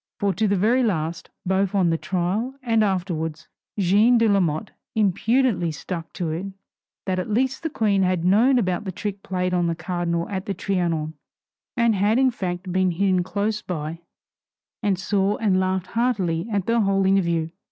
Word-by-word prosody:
For 200 -2 +1
to 215 +5 +1
the 200 - +2
very 225 +7 +3
last, 170 -7 -1 0.2
both 190 +1 +1
on 180 -4 +3
the 165 - +1
trial 195 +8 -1
and 225 -3 +2
afterwards, 170 -5 -2 0.3
Jeanne 205 +6 +4
de 230 -1 +3
Lamotte 180 -7 +1 0.2
impudently 215 -2 +2
stuck 165 +2 -6
to 170 -4 -3
it 170 +5 -3 0.6
that 185 -1 -1
at 185 - -4
least 260 +5 0
the 325 - -2
Queen 210 -8 +1
had 180 -2 +1
known 230 +8 +4
about 185 -3 0
the 190 - -3
trick 195 +2 -5
played 180 -1 -2
on 175 -1 +2
the 165 - -1
Cardinal 170 -1 -2
at 190 -2 -4
the 200 - -2
Trianon, 170 -5 -1 0.6
and 235 -1 +3
had 205 +3 +2
in 260 -1 +4
fact 185 -4 -4
been 185 0 +2
hidden 185 +1 +1
close 210 +4 -2
by 165 -3 -5 0.8
and 200 -4 +1
saw 195 +1 0
and 195 -4 +2
laughed 185 -1 0
heartily 200 -7 0
at 200 -3 0
the 230 0 +2
whole 195 -1 +2
interview. 170 -4 +2
190 Hz, 175 wpm, -23 LUFS, 175-210 Hz, 0.8 s, Jeanne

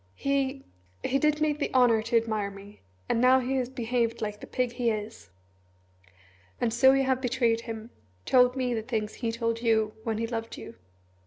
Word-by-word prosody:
"He 275 -1 -1 0.4
he 275 - +1
did 300 +1 +1
me 305 -1 +3
the 295 0 -3
honour 240 -3 +5
to 230 +2 +1
admire 215 -3 -1
me 200 +1 -13 0.3
and 230 - +1
now 255 +1 +6
he 260 +1 -1
has 250 -1 -1
behaved 235 -2 -1
like 210 -2 -4
the - - -10
pig 250 -1 -1
he 240 -1 0
is." 215 - -5 1.3
"And 230 - 0
so 265 +3 +6
you 270 0 +3
have 260 -1 0
betrayed 240 -3 +1
him 225 0 -7 0.3
told 250 0 +4
me 255 -2 -1
the 225 - -1
things 220 -2 -3
he 230 -2 -3
told 230 0 -2
you 220 -2 +2
when 225 -2 -2
he 230 - -1
loved 225 -1 -5
you?" - - -9
235 Hz, 190 wpm, -27 LUFS, 225-260 Hz, 1.3 s, now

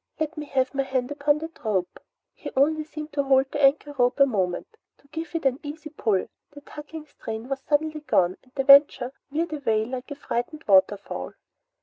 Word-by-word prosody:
"Let 315 +1 -2
me 300 -2 -6
have 265 -1 0
my 275 - +1
hand 265 -1 -2
upon 290 0 +2
that 320 +1 -9
rope!" 195 -5 -1 0.3
He - - -8
only 310 +3 +3
seemed 305 0 -8
to 285 - +1
hold 270 -1 +3
the 290 - -2
anchor 290 +1 +3
rope 245 +1 +2
a 275 - +8
moment 200 - -2 0.2
and 280 - -28
give 330 +1 -6
it 325 - -2
an 265 0 +2
easy 305 +1 -8
pull. 215 -10 0 0.2
The 290 - -13
tugging 300 +2 -9
strain 225 -5 -7
was 275 0 -3
suddenly 305 +2 0
gone 185 -11 +2
and 255 - -27
the 270 - 0
Venture 275 -2 +6 0.2
veered 315 +3 -2
away 225 -7 0
like 255 +1 -6
a 285 - -5
frightened 285 +2 -4
waterfowl. 195 0 +2
280 Hz, 200 wpm, -25 LUFS, 250-300 Hz, 0.3 s, a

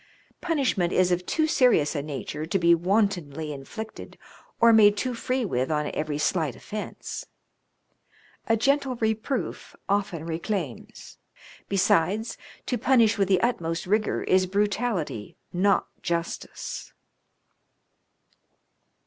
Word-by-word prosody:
Punishment 265 - +1
is 180 -1 +3
of 180 0 0
too 315 - +2
serious 250 - +3
a 145 - 0
nature 150 +1 -5
to 185 - +1
be 170 -2 +5
wantonly 170 -5 0
inflicted 220 +11 -8 0.4
or 230 -1 +7
made 210 -2 +6
too 250 +4 -1
free 255 +1 -1
with 130 -9 -1
on 150 -1 0
every 150 -1 -2
slight 150 -2 0
offence. 215 0 -6 1.2
A 225 -1 +3
gentle 270 +2 +1
reproof 220 +3 -2
often 195 -5 -1
reclaims; 165 - -5 0.5
besides, 195 +3 +2 0.3
to 245 - -1
punish 230 -3 +4
with 195 - +3
the 185 -2 +3
utmost 165 -9 -1
rigour 210 +3 +1
is 185 0 +3
brutality, 200 - -1 0.2
not 195 +3 +3 0.2
justice." 170 0 -4
195 Hz, 115 wpm, -26 LUFS, 165-225 Hz, 1.2 s, or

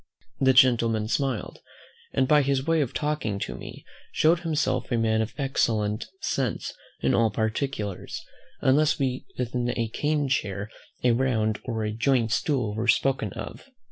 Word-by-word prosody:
The 130 -1 +4
gentleman 115 -4 +4
smiled; 130 -1 -2 0.5
and, 130 -1 +1
by 150 +1 +5
his 135 -1 0
way 165 -1 +2
of 135 - -1
talking 150 -9 -1
to - - -3
me, - - -10 0.3
showed 165 +2 +3
himself 160 -4 -1
a 120 - +2
man 110 -1 +2
of 110 - -4
excellent 110 -6 0
sense 130 -5 -2 0.3
in 65 - +2
all 115 -1 +4
particulars, 110 -2 -3 0.4
unless 145 +3 +3
when 130 -2 -1 0.2
a 120 -1 -2
cane 150 -1 0
chair, 105 -5 -2 0.3
a 125 - +5
round 115 -4 +1
or 115 -3 -2
a 105 - -1
joint 115 0 +1
stool, 125 -8 0
were 115 +3 -2
spoken 125 -3 +2
of. - - -8
125 Hz, 150 wpm, -26 LUFS, 110-140 Hz, 0.5 s, by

